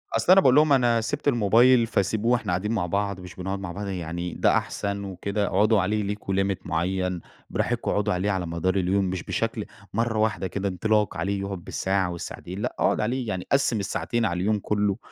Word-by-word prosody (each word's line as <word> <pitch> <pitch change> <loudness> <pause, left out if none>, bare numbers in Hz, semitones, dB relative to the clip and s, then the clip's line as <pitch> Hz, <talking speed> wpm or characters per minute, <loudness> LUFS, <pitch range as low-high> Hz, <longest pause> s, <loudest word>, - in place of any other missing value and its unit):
أصل 180 - +3
أنا 195 +1 +8
باقول 130 -4 +5
لهم 150 -1 +5
أنا 120 -3 +3
سِبت 145 +6 -3
الموبايل 120 0 +5
فسيبوه 110 +3 +1
إحنا 110 -6 -2
قاعدين 105 +5 -1
مع 100 -6 0
بعض، 100 +1 -1
مش 90 -1 -10
بنقعد 95 +2 -4
مع 95 -3 -5
بعض 100 +2 -5
يعني 85 -1 -4
ده - - +3
أحسن 100 0 -3
وكده 100 +2 -2
اقعدوا 105 +1 +3
عليه 105 +2 0
ليكم 100 -1 -3
limit 95 -1 0
معيَّن 90 +1 -1 0.3
براحتكم - - -1
اقعدوا 105 -1 +1
عليه 95 +3 0
على 95 -2 -1
مدار 85 +3 -1
اليوم 95 +1 +1
مش 90 -1 -3
بشكل 110 +3 -2 0.3
مرة 115 0 0
واحدة 110 -3 0
كده 100 +1 -3
انطلاق 105 0 0
عليه 100 +3 -1
يقعد 100 -3 -5
بالساعة 95 -1 -1
والساعتين، 90 +2 -7
لأ - - -3
أقعد - - +2
عليه 120 +2 -1
يعني 95 -3 -4
قسِّم 135 -5 +2
الساعتين 115 +4 -1
على 90 -2 -1
اليوم 105 +1 +1
كله، 105 -1 0
100 Hz, 200 wpm, -25 LUFS, 95-110 Hz, 0.3 s, أنا